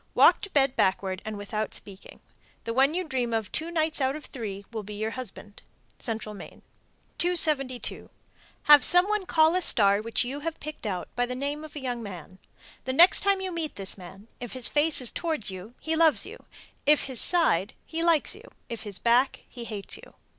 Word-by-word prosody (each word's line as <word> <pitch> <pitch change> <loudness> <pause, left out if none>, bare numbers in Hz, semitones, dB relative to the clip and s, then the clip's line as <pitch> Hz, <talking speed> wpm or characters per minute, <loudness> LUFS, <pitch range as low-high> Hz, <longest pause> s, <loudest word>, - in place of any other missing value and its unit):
Walk - - +6
to 405 - -6
bed 275 -6 +2
backward 190 -1 0
and 215 -1 -5
without 210 +1 -4
speaking. 195 -1 -7 0.4
The 230 - -3
one 270 +5 +3
you 370 - -1
dream 245 -5 -1
of 220 -4 -3
two 320 +2 -3
nights 315 -2 0
out 265 +1 +1
of 305 - -9
three 200 -6 -7
will 225 -2 -4
be 210 +1 -9
your 215 +2 -3
husband. 210 -4 -9 0.4
Central 220 -3 -4
Maine. 200 - -12 0.6
272. 300 -8 +2 0.5
Have 295 -1 +8
some 355 +2 +4
one 420 -3 -1
call 315 0 +4
a 365 - +1
star 200 - +4
which 230 +2 +1
you 265 +4 -5
have 325 +2 -5
picked 300 -6 -7
out, 185 -3 -3
by 245 0 0
the 250 - -4
name 285 +3 -4
of 310 -1 -11
a - - -4
young 245 -3 -4
man. 185 -3 -10 0.5
The 260 - -2
next 345 +7 +7
time 395 -1 +2
you 375 -1 -3
meet 330 -3 -4
this 195 -1 -3
man, 195 +3 -13
if 245 -2 -7
his 255 -2 0
face 300 -1 +3
is 245 - 0
toward 315 - -2
you, 190 +6 -10
he 320 0 -2
loves 320 -1 +4
you; - - -12 0.4
if 300 0 +5
his 260 -3 +1
side, 230 - +2
he 330 0 -4
likes 335 -3 +3
you; - - -12 0.2
if 230 -1 -6
his 205 -3 -5
back, 245 +3 +2
he 240 -2 -9
hates 210 -3 -3
you. - - -16
255 Hz, 205 wpm, -26 LUFS, 210-315 Hz, 0.6 s, Have